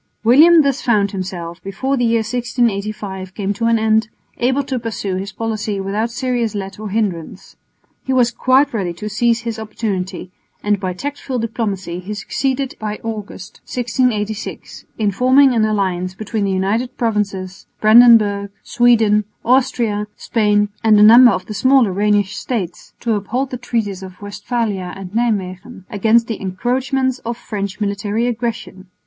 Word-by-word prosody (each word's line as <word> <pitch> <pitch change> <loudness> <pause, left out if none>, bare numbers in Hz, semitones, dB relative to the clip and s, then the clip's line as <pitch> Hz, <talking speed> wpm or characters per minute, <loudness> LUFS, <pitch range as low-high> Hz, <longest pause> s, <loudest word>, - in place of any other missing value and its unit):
William 310 +8 +7
thus 275 -1 0
found 205 -4 +2
himself, 180 -3 -6
before 260 +8 -2
the 245 - 0
year 230 -1 +2
1685 215 -5 -2
came 200 -1 -2
to 230 +3 -3
an 230 0 +3
end, 220 0 +2 0.3
able 260 +3 +1
to 265 -2 -3
pursue 210 -4 -3
his 195 +1 -5
policy 215 -1 -3
without 205 +4 -2
serious 240 -3 -2
let 195 0 -6
or 215 -1 -5
hindrance. 195 -6 -3 0.5
He 265 - -3
was 245 -2 +3
quite 260 +4 +2
ready 185 -6 -2
to 190 +5 -7
seize 230 +2 +1
his 230 -1 -4
opportunity, 200 -4 -4 0.3
and 205 -1 +1
by 185 -2 -3
tactful 275 +4 -5
diplomacy 205 -6 -3
he 200 +3 -6
succeeded 265 +6 -2
by 210 -1 -4
August, 210 -5 -7
1686, 230 -4 -2
in 210 -2 +1
forming 260 +5 +4
an 225 -2 +2
alliance 185 -4 -1
between 215 0 -3
the 195 - 0
United 215 +7 -1
Provinces, 200 -5 -2
Brandenburg, 215 -3 +6
Sweden, 225 -4 +3 0.2
Austria, 235 -5 +1
Spain 210 -2 +1
and 215 -2 +5
a - - +7
number 240 +3 +9
of 185 - -1
the 215 - -7
smaller 255 -3 +3
Rhenish 205 0 +1
states, 195 -9 -4
to 230 -2 0
uphold 240 +6 -2
the 250 - -3
treaties 220 -6 -3
of 185 -1 -10
Westphalia 205 -3 -3
and 195 -1 -9
Nijmwegen 210 -2 -2
against 225 +3 +3
the 225 -2 -5
encroachments 255 +7 -1
of 235 0 -5
French 200 -3 -5
military 205 +2 -1
aggression. 230 -5 -4
215 Hz, 155 wpm, -18 LUFS, 200-240 Hz, 0.5 s, number